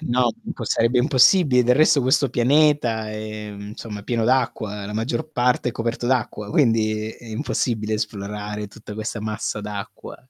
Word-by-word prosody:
No, 125 -5 +1 0.2
po 115 - -6
sarebbe 115 +3 +2
impossibile. 130 +1 +5
Del 125 +1 +4
resto 155 -1 +5
questo 130 +1 +3
pianeta 125 -3 +2
è, 110 0 -6
insomma, 105 +1 -7
è - - -14
pieno 115 0 -1
d'acqua, 110 -5 0
la 105 - -6
maggior 130 +8 -2
parte 125 -2 +1
è - - -4
coperto 115 +1 -3
d'acqua, 115 -5 -1
quindi 110 -4 +2
è 120 - -14
impossibile 110 -2 -2
esplorare 105 0 -4
tutta 105 0 -11
questa 110 0 -4
massa 105 0 -3
d'acqua. 105 -1 -7
115 Hz, 155 wpm, -22 LUFS, 105-125 Hz, 0.2 s, impossibile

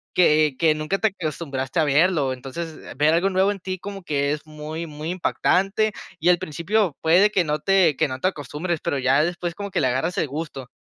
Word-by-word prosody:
que 155 -5 +4
que 160 -2 +4
nunca 155 +6 -2
te 220 - +3
acostumbraste 145 -2 -3
a 160 - +4
verlo. 145 -1 +2
Entonces, 155 +5 -7 0.2
ver 150 +2 +4
algo 175 +4 +2
nuevo 190 +1 +2
en 200 - -5
ti 185 +1 -4
como 195 0 -7
que 140 -3 0
es 150 0 -4
muy, 155 +2 -6
muy 150 +2 -6
impactante 195 +3 +1 0.3
y, 170 - +2
al 180 - +5
principio, 170 +3 -1
puede 180 +6 +5
que 185 - +2
no 150 -1 -1
te 190 -6 +3
que - - +2
no 130 -1 -5
te 185 - +2
acostumbres, 160 +1 -4
pero 140 - -1
ya 135 +3 +3
después 175 0 -2
como 200 +1 -5
que - - 0
le 130 - +3
agarras 135 +8 -1
el - - 0
gusto. 140 -3 -6
160 Hz, 215 wpm, -23 LUFS, 150-185 Hz, 0.3 s, al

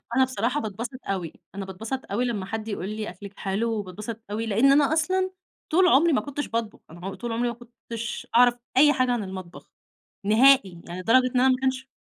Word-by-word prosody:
أنا 260 - +5
بصراحة 255 +2 -1
باتبسط 230 +3 -5
أوي، 185 -5 -3 0.2
أنا 200 - -4
باتبسط 220 +8 -5
أوي 235 +5 +1
لمّا 215 -6 -2
حد 220 +2 -5
يقول 200 -2 -4
لِي 215 0 -4
أكلِك 200 +3 -11
حلو، 205 +4 -1
وباتبسط 210 +2 -5
أوي 220 +2 -2
لأن 225 +6 +4
أنا 285 +1 +4
أصلًا 370 +4 +1 0.4
طول 360 +3 +5
عمري 330 +1 +5
ما - - +2
كنتش 290 0 -4
باطبخ، 225 -2 -3
أنا 175 +3 -11
عم 195 - -4
طول 240 0 -5
عمري 235 +2 0
ما - - -3
كنتش 235 -1 -7
أعرف 245 0 +6 0.2
أي 295 +2 +7
حاجة 255 -2 +1
عن 240 -3 0
المطبخ 185 -2 -9 0.6
نهائي. 215 -5 +5
يعني 175 +2 -6
لدرجة 255 +6 +4
إن - - +4
أنا 260 - +5
ماكنش 260 0 0
230 Hz, 200 wpm, -25 LUFS, 200-260 Hz, 0.6 s, أي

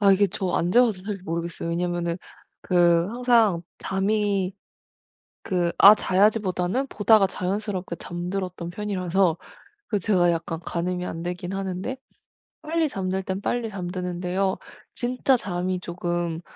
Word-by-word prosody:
아 200 -1 +6
이게 200 +1 +4
저 190 -1 -2
안 175 - +1
재봐서 225 -4 +3
사실 200 -2 -5
모르겠어요, 170 0 -3
왜냐면은 170 0 -1 0.5
그 175 -2 +4
항상 230 -6 +3 0.2
잠이 195 -1 0 0.9
그 175 -2 0
'아 205 +2 +10
자야지.'보다는 205 +4 +1
보다가 210 -3 +4
자연스럽게 190 -1 -3
잠들었던 180 0 -4
편이라서 185 -3 0 0.5
그 210 - 0
제가 175 -2 +3
약간 165 0 -3
가늠이 180 +1 -2
안 165 - -5
되기는 180 +2 -4
하는데 195 +6 -3 0.7
빨리 320 +1 0
잠들 190 -2 -2
때는 190 +1 -3
빨리 235 +1 -1
잠드는데요. 180 0 -2 0.4
진짜 250 +2 +1
잠이 185 -4 -2
쪼금 175 -2 -3
185 Hz, 295 characters per minute, -25 LUFS, 175-205 Hz, 0.9 s, 아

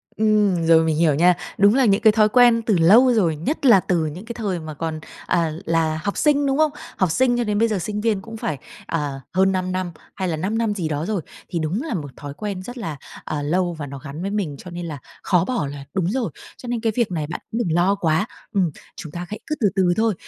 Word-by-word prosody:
Ừm, 210 -6 +2
rồi, 165 0 +6
mình 160 -1 +1
hiểu 155 -3 +3
nha. 175 +3 +5 0.2
Đúng 205 +3 +5
là 265 -1 +4
những 200 -1 +3
cái 220 -2 +7
thói 215 -1 +4
quen 240 -1 +5
từ 215 -5 +1
lâu 225 +10 +6
rồi, 175 -8 +2
nhất 275 - -3
là 225 -7 +8
từ 170 -3 0
những 170 +7 -6
cái 235 - -6
thời 200 -7 -2
mà 155 -1 -7
còn, 160 +1 -4 0.3
à, 165 -2 +1
là 160 -1 +1
học 200 - -2
sinh, 290 -2 +3
đúng 270 +1 +1
không? 310 -1 +3 0.3
Học 185 -4 +2
sinh 245 +3 +2
cho 240 - +1
đến 210 -1 0
bây 230 - +4
giờ 210 -4 -1
sinh 210 +3 -3
viên 215 -4 +1
cũng 225 +2 -9
phải, 155 -9 -3 0.3
ờ, 145 -4 -3
hơn 190 +1 +3
5 185 -1 -1
năm, 185 -1 -2 0.2
hay 190 -1 -2
là 160 -2 -1
5 205 +7 -1
năm 225 -3 +1
gì 175 -6 -2
đó 150 +1 -2
rồi. 205 -4 -1 0.3
Thì 170 - -2
đúng 165 - -1
là 315 -5 -4
một 145 -7 -4
thói 145 -1 -7
quen 200 +1 -5
rất 245 +5 -8
là, 165 -10 -5 0.3
à, 150 -1 -3
lâu 175 +4 0
và 155 -2 -6
nó 140 - -7
gắn 150 +3 -8
với 195 +2 -2
mình, 185 -9 -2
cho 180 - -10
nên 175 0 -5
là 155 -3 -5 0.3
khó 180 -1 +2
bỏ 240 - -1
là 140 0 -7
đúng 185 -2 0
rồi. 245 -3 -1 0.3
Cho 250 - -10
nên 240 -1 -1
cái 225 - +1
việc 235 -6 +1
này 155 -4 -2
bạn 165 - -5
cũng 225 - -3
đừng 175 -9 0
lo 185 +3 +3
quá, 165 0 +1 0.3
ừm, 185 -6 +2 0.2
chúng 160 -7 -8
ta 175 +2 -5
hãy 210 - -6
cứ 305 - -1
từ 210 - +3
từ 180 -2 +3
thôi. 220 0 +2
185 Hz, 265 wpm, -22 LUFS, 160-220 Hz, 0.3 s, là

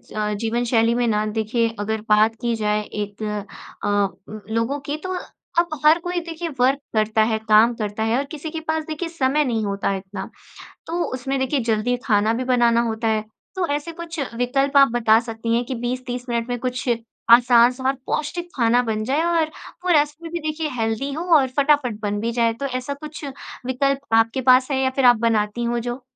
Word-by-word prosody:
अ, 210 0 -1
जीवन 225 +3 -1
शैली 230 -1 +3
में 245 -1 +1
ना, 215 -1 +1
देखिए, 220 +2 0
अगर 220 +1 -2
बात 215 +1 +4
की 235 -1 0
जाए 210 -1 0
एक 205 0 -6 0.6
अ, - - 0 0.7
लोगों 235 +6 0
की, 290 +2 -4
तो 370 +4 -5 0.5
अब 315 -4 -1
हर 315 +3 +7
कोई, 355 +1 -2
देखिए, 335 0 -5
वर्क 265 +3 +3 0.2
करता 215 0 +2
है, 220 - +1
काम 220 +3 +6
करता 215 -1 -3
है 225 +2 +1
और 280 - -1
किसी 310 +1 -6
के 325 - -4
पास, 315 0 0
देखिए, 315 +2 -4
समय 295 -2 +1
नहीं 225 -3 -1
होता 200 0 -1
इतना। 190 0 -7 0.6
तो 340 +1 -1
उसमें, 265 +1 -2
देखिए, 265 +2 0
जल्दी 225 +3 +1
खाना 215 -1 +3
भी 250 +3 -2
बनाना 235 -1 +4
होता 220 +1 -2
है। 220 -1 +1 0.3
तो 370 -2 0
ऐसे 295 +3 -3
कुछ 335 0 -7 0.2
विकल्प 270 +3 0
आप 275 0 +8
बता 225 -2 +4
सकती 230 0 -2
हैं 240 - +1
कि 260 - -4
20-30 245 0 -3
मिनट 235 0 -1
में 245 - -1
कुछ 250 0 -3 0.4
आसान 240 0 +7
और 265 - +3
पौष्टिक 345 +3 -3
खाना 240 0 +3
बन 215 -1 -1
जाए 270 +7 0
और 330 -2 +1 0.3
वो - - 0
रस 295 0 -4
में 330 -1 -8
भी, 345 - -2
देखिए, 310 0 -3
हेल्दी 225 +5 -1
हो 320 +4 -3
और 270 - +2
फटाफट 280 -6 +2
बन 205 0 -2
भी 230 +1 -1
जाए? 230 -1 +1
तो 275 +5 -5
ऐसा 255 +1 -3
कुछ 300 +1 -9 0.4
विकल्प 275 0 -1
आपके 225 +3 +3
पास 255 +1 +4
है 265 - +1
या 260 - +2
फिर 270 - +2
आप 245 -1 +8
बनाती 215 +1 0
हों, 235 0 0
जो? 245 +2 -5
245 Hz, 200 wpm, -22 LUFS, 225-285 Hz, 0.7 s, आप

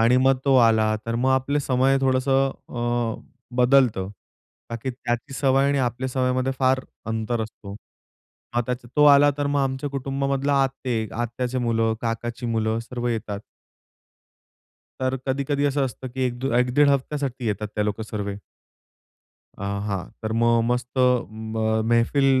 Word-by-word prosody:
आणि, 120 +3 +5
मग 130 0 +4
तो 135 -1 +4
आला 110 -2 +4
तर, 115 - -2
मग 130 +3 +1
आपलं 130 +2 +1
समय 135 0 +2
थोडंसं 135 +1 +2 0.2
अ, 120 -1 -2 0.4
बदलतं. 125 -7 +3 0.6
बाकीत्याची 120 +2 -4
सवय 135 0 +3
आणि 140 -1 +1
आपल्या 130 +1 -1
सवयींमधे 130 0 0
फार 130 0 +3 0.3
अंतर 110 +1 -2
असतो. 105 -2 -9 0.8
मग 120 - +3
त्याचा 125 -1 -4
तो 150 - +6
आला 145 0 +7
तर, 145 - 0
मग 145 0 +1
आमच्या 135 +1 -2
कुटुंबामधला 140 +1 -1
आत्ते, 125 -4 -2
आत्याचे 120 +2 -2
मुलं, 115 -2 +1
काकाची 120 +1 -3
मुलं 110 -1 0
सर्व 120 -1 -2
येतात. 110 -3 -3 1.6
तर, 130 0 0
कधी-कधी 140 +2 0
असं 140 -1 +1
असतं, 130 0 -6
की 130 +1 -4
एकदू 120 +1 -3
एक-दीड 125 +4 +4
हफ्त्यासाठी 140 -2 -1
येतात 105 0 -2
ते 105 - +1
लोक 105 +1 -2
सर्व. 100 -2 -3 1.3
आ, 100 - -5 0.2
हां 95 -3 -2 0.2
तर 110 - -2
मग 115 0 +4
मस्त 125 0 -1 0.4
म 110 0 -1
मैफिल 125 +4 +3
125 Hz, 140 wpm, -24 LUFS, 115-135 Hz, 1.6 s, आला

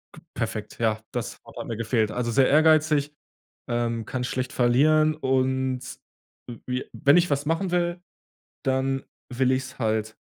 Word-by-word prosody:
k 155 - -13
perfekt, 110 -2 -4
ja, 110 -1 +1
das - - -4
Wort - - -9
mir 115 - -3
gefehlt. 110 -1 0
Also 120 0 -2
sehr 130 +1 +4
ehrgeizig, 155 -1 +4 0.6
ähm, 115 -1 -1
kann 130 -1 -3
schlecht 130 +1 -3
verlieren 155 +5 +4
und 130 -2 0 0.7
w 120 - -7
wie 125 0 -2
wenn 140 +5 +4
ich 175 -1 +3
was 140 0 0
machen 170 +4 0
will, 175 0 0 0.6
dann 135 0 0 0.3
will 130 +1 +2
ich's 130 0 -3
halt 110 -1 -1
130 Hz, 150 wpm, -25 LUFS, 120-150 Hz, 0.7 s, sehr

